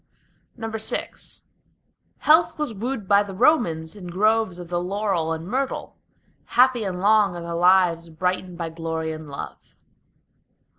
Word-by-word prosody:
VI 225 -1 -2 1.1
Health 320 +3 +4
was 300 -6 -2
wooed 225 0 -4
by 200 +1 +5
the 200 -2 -6
Romans 185 - +2
in 190 -4 -9
groves 215 +1 +1
of 175 -1 -9
the 175 0 -1
laurel 190 -3 -1
and 165 0 -4
myrtle. 265 +5 -3 0.5
Happy 250 -2 +3
and 185 -3 -3
long 205 -1 +4
are 175 - -6
the 170 0 -5
lives 175 -1 +3
brightened 180 +2 -2
by 165 -1 -3
glory 160 -1 -3
and 155 -1 -8
love. 140 - -9
185 Hz, 140 wpm, -23 LUFS, 170-220 Hz, 1.1 s, by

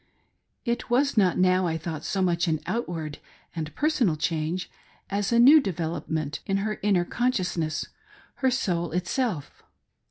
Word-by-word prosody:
It 240 0 -2
was 270 +3 +2
not 190 -5 +3
now, 185 0 +3
I 160 -1 -1
thought, 155 -1 -5
so 190 -2 -1
much 175 -1 +1
an 160 -2 +1
outward 170 -7 -3 0.4
and 155 -2 -4
personal 270 - +2
change, 160 +3 -2 0.4
as 200 +1 0
a 235 - +4
new 280 +6 +8
development 160 - -3
of 195 - +2
her 215 +2 -2
inner 190 -4 +2
con 245 +7 +1
sciousness— 165 -6 -2 0.5
her 265 - +2
soul 175 - -1
itself. 180 - -2
180 Hz, 150 wpm, -26 LUFS, 160-230 Hz, 0.5 s, new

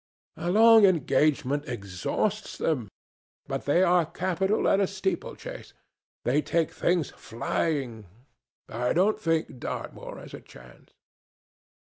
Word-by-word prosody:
"A 175 - -3
long 225 +3 +7
engagement 150 -5 +2
exhausts 120 - -3
them, 130 -10 -1 0.6
but 135 -1 -4
they 170 +6 +3
are 175 -1 +4
capital 185 +5 -1
at 195 - +4
a 195 - +2
steeplechase. 190 0 -5 0.5
They 140 +5 +2
take 165 0 0
things 175 -5 0
flying. 120 - -3 0.6
I 120 +2 -1
don't 200 +5 +2
think 165 - -1
Dartmoor - - -6
has - - -11
a - - -8
chance." - - -17
160 Hz, 115 wpm, -27 LUFS, 130-190 Hz, 0.6 s, long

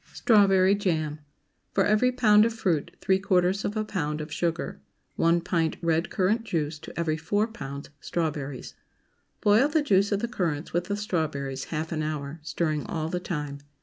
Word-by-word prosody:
STRAWBERRY 195 -4 +5
JAM. 160 -6 0
✠ - - -17 0.6
For 195 - +4
every 215 +4 +3
pound 215 -4 +5
of 230 0 0
fruit 175 -9 0
three 190 -1 +2
quarters 190 0 +2
of 210 - -2
a 215 - 0
pound 150 -7 -2
of 155 0 -6
sugar. 170 -1 -2 0.4
1 170 +1 +3
pint 165 -2 0
red 165 0 +1
currant 210 +4 +1
juice 155 -6 -2
to - - -9
every 160 -2 0
4 205 +7 +1
pounds 140 -13 -8
strawberries. 150 -5 -3 0.7
Boil 210 +7 +5
the 300 0 +1
juice 200 -5 +3
of 200 - +1
the 235 - -1
currants 170 -10 -2
with 175 +1 0
the 205 - -2
strawberries 145 -9 -2
half 160 0 -4
an 155 -2 -1
hour, 150 0 -4
stirring 155 -1 -1
all 160 -1 -2
the 180 - -2
time. 150 -5 -4
170 Hz, 180 wpm, -27 LUFS, 155-205 Hz, 0.7 s, STRAWBERRY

